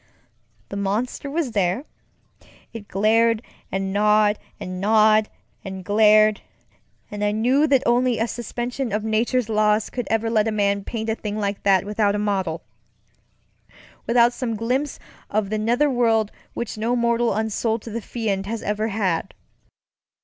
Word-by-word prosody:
The -, -, -6 dB
monster 215 Hz, +8 st, -2 dB
was 295 Hz, -3 st, -2 dB
thereŌĆöit 205 Hz, -, -6 dB
glared 225 Hz, +3 st, +2 dB, 0.3 s
and 195 Hz, 0 st, -2 dB
gnawed 210 Hz, 0 st, +3 dB, 0.2 s
and 185 Hz, 0 st, -6 dB
gnawed 215 Hz, +1 st, +4 dB, 0.3 s
and 190 Hz, -2 st, -7 dB
glaredŌĆöand 215 Hz, +1 st, +5 dB, 0.7 s
I 210 Hz, 0 st, -1 dB
knew 250 Hz, +8 st, +2 dB
that 270 Hz, -3 st, +3 dB
only 245 Hz, 0 st, +2 dB
a 225 Hz, -, 0 dB
suspension 240 Hz, +2 st, -4 dB
of 210 Hz, +1 st, -1 dB
nature's 225 Hz, +2 st, 0 dB
laws 215 Hz, -1 st, +1 dB
could 245 Hz, -2 st, -4 dB
ever 225 Hz, 0 st, +1 dB
let 215 Hz, -1 st, +2 dB
a -, -, 0 dB
man 200 Hz, -1 st, 0 dB
paint 220 Hz, +1 st, -3 dB
a -, -, +1 dB
thing 210 Hz, -1 st, -5 dB
like 200 Hz, -1 st, -2 dB
that 195 Hz, -1 st, +3 dB
without 205 Hz, 0 st, +1 dB
a 195 Hz, -6 st, -1 dB, 1.5 s
modelŌĆöwithout 235 Hz, 0 st, +4 dB
some 240 Hz, -2 st, -3 dB
glimpse 255 Hz, +6 st, -1 dB, 0.3 s
of 210 Hz, -1 st, -1 dB
the 215 Hz, -, 0 dB
nether 240 Hz, +7 st, +2 dB
world 225 Hz, -5 st, +2 dB, 0.2 s
which 230 Hz, -2 st, -4 dB
no 235 Hz, +3 st, 0 dB
mortal 235 Hz, 0 st, +1 dB
unsold 220 Hz, +1 st, -1 dB
to 230 Hz, -, -8 dB
the 230 Hz, +2 st, -4 dB
Fiend 200 Hz, -3 st, -3 dB
has 225 Hz, +1 st, -4 dB
ever 210 Hz, +1 st, -1 dB
had. 195 Hz, -6 st, -2 dB
215 Hz, 145 wpm, -22 LUFS, 205-235 Hz, 1.5 s, glaredŌĆöand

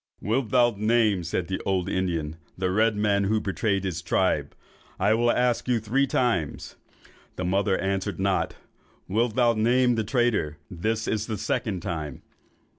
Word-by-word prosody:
"'Wilt 115 Hz, +3 st, -1 dB
thou 120 Hz, 0 st, +4 dB
name,' 110 Hz, -4 st, +2 dB
said 85 Hz, +1 st, -2 dB
the 95 Hz, -, -3 dB
old 95 Hz, -2 st, 0 dB
Indian, 85 Hz, -5 st, -2 dB, 0.2 s
'the 90 Hz, 0 st, 0 dB
red 110 Hz, +2 st, +2 dB
man 100 Hz, -1 st, +1 dB
who 110 Hz, +2 st, +2 dB
betrayed 100 Hz, 0 st, -1 dB
his 90 Hz, -3 st, -3 dB
tribe? 85 Hz, -, 0 dB, 0.4 s
I 100 Hz, +3 st, +3 dB
will 120 Hz, +2 st, +2 dB
ask 125 Hz, 0 st, +1 dB
thee 125 Hz, -2 st, +2 dB
three 120 Hz, +6 st, +1 dB
times.' 115 Hz, -, -1 dB, 0.6 s
The 90 Hz, -, -3 dB
mother 95 Hz, +1 st, +1 dB
answered 95 Hz, -1 st, -2 dB
not. 95 Hz, 0 st, 0 dB, 0.5 s
'Wilt 110 Hz, +3 st, 0 dB
thou 120 Hz, -2 st, +4 dB
name 120 Hz, +3 st, +3 dB
the 110 Hz, -1 st, 0 dB
traitor? 110 Hz, -, 0 dB
This 110 Hz, +6 st, -2 dB
is 110 Hz, -1 st, -1 dB
the 110 Hz, -2 st, -3 dB
second 100 Hz, -1 st, -2 dB
time. 80 Hz, -7 st, -5 dB
105 Hz, 160 wpm, -26 LUFS, 95-115 Hz, 0.6 s, thou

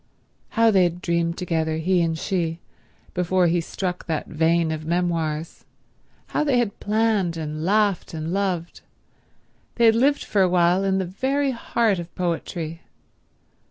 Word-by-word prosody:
How 230 Hz, 0 st, +5 dB
they 195 Hz, -3 st, +4 dB
had 175 Hz, -1 st, +1 dB
dreamed 170 Hz, -1 st, -1 dB
together, 160 Hz, -3 st, -1 dB
he 180 Hz, +2 st, +2 dB
and 165 Hz, -1 st, 0 dB
she, 165 Hz, -3 st, -1 dB, 0.6 s
before 180 Hz, +1 st, +2 dB
he 170 Hz, 0 st, +2 dB
struck 180 Hz, +2 st, -4 dB
that 160 Hz, -3 st, -2 dB
vein 165 Hz, +1 st, +1 dB
of 155 Hz, 0 st, -4 dB
memoirs; 165 Hz, -2 st, -2 dB, 0.7 s
how -, -, 0 dB
they 280 Hz, -4 st, +2 dB
had 235 Hz, -4 st, -1 dB
planned, 210 Hz, -5 st, +1 dB
and 155 Hz, -1 st, -4 dB
laughed 205 Hz, +1 st, +1 dB
and 160 Hz, +2 st, -3 dB
loved. 185 Hz, -4 st, -2 dB, 0.9 s
They 235 Hz, -, +3 dB
had 225 Hz, -, +7 dB
lived 280 Hz, +5 st, +2 dB
for 200 Hz, -, +1 dB
a 185 Hz, -, +4 dB
while 180 Hz, +1 st, +3 dB
in 190 Hz, -1 st, +1 dB
the 190 Hz, -, 0 dB
very 270 Hz, +9 st, 0 dB
heart 230 Hz, -4 st, 0 dB
of 170 Hz, 0 st, -9 dB
poetry. 170 Hz, -2 st, -3 dB
175 Hz, 155 wpm, -23 LUFS, 165-200 Hz, 0.9 s, had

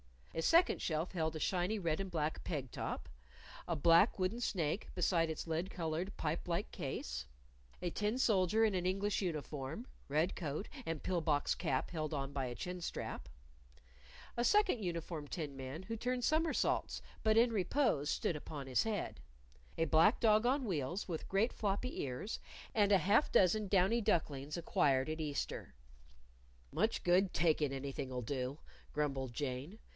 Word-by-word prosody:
A 165 Hz, -, -1 dB
second 335 Hz, -, +4 dB
shelf 160 Hz, +2 st, -1 dB
held 160 Hz, -3 st, -1 dB
a -, -, -3 dB
shiny 185 Hz, +6 st, 0 dB
red 165 Hz, -4 st, 0 dB
and 195 Hz, -1 st, -3 dB
black 160 Hz, -3 st, -2 dB
peg 135 Hz, -7 st, -3 dB
top, -, -, -4 dB, 0.6 s
a 170 Hz, -, 0 dB
black 170 Hz, +7 st, +5 dB
wooden 190 Hz, +5 st, 0 dB
snake 180 Hz, -6 st, -1 dB
beside 170 Hz, -2 st, +2 dB
its 160 Hz, -, -4 dB
lead 165 Hz, +3 st, -1 dB
colored 170 Hz, +2 st, -3 dB
pipe 160 Hz, +3 st, -2 dB
like 175 Hz, +4 st, -1 dB
case; 65 Hz, -, -4 dB, 0.5 s
a 175 Hz, -, -1 dB
tin 210 Hz, +6 st, 0 dB
soldier 215 Hz, -3 st, +3 dB
in 215 Hz, -, +2 dB
an 180 Hz, -1 st, -1 dB
English 195 Hz, +3 st, +1 dB
uniform 155 Hz, -, -3 dB, 0.2 s
red 155 Hz, +5 st, +1 dB
coat, 155 Hz, +3 st, -4 dB, 0.2 s
and 165 Hz, -2 st, -3 dB
pill 180 Hz, -2 st, 0 dB
box 150 Hz, -2 st, +2 dB
cap 130 Hz, -1 st, -1 dB
held 155 Hz, -2 st, -3 dB
on 135 Hz, -1 st, -2 dB
by 140 Hz, -2 st, -2 dB
a 120 Hz, -1 st, -4 dB
chin 180 Hz, +7 st, -5 dB
strap; -, -, -4 dB, 1.1 s
a 240 Hz, -, +2 dB
second 415 Hz, -, +4 dB
uniformed 165 Hz, -4 st, -4 dB
tin 150 Hz, -5 st, -4 dB
man 135 Hz, +6 st, -6 dB
who 225 Hz, +4 st, -4 dB
turned 250 Hz, +2 st, -1 dB
somersaults, 315 Hz, +4 st, +1 dB, 0.2 s
but 220 Hz, 0 st, +4 dB
in 235 Hz, +1 st, +5 dB
repose 195 Hz, -, +1 dB
stood 165 Hz, -, 0 dB
upon 145 Hz, -2 st, -7 dB
his 130 Hz, -, +2 dB
head; 215 Hz, -4 st, -2 dB, 0.6 s
a 165 Hz, -, +2 dB
black 160 Hz, -, +5 dB
dog 215 Hz, -1 st, +4 dB
on 265 Hz, +3 st, +2 dB
wheels, 175 Hz, -, -2 dB
with 165 Hz, -2 st, -4 dB
great 205 Hz, +5 st, +2 dB
floppy 210 Hz, +5 st, -1 dB
ears; 135 Hz, -, -4 dB, 0.3 s
and 205 Hz, -2 st, +3 dB
a -, -, +8 dB
half 210 Hz, +10 st, +3 dB
dozen 200 Hz, +3 st, +4 dB
downy 195 Hz, +4 st, +3 dB
ducklings 150 Hz, -7 st, 0 dB
acquired 135 Hz, -4 st, +2 dB
at 155 Hz, +1 st, -3 dB
Easter. 145 Hz, -, -3 dB, 1.0 s
"Much 225 Hz, -, 0 dB
good 180 Hz, +2 st, +3 dB
takin' 155 Hz, -4 st, +2 dB
anything'll 135 Hz, -2 st, -4 dB
do!" 130 Hz, +2 st, -3 dB, 0.4 s
grumbled 135 Hz, -4 st, -1 dB
Jane. 140 Hz, -, -4 dB
170 Hz, 160 wpm, -36 LUFS, 150-205 Hz, 1.1 s, a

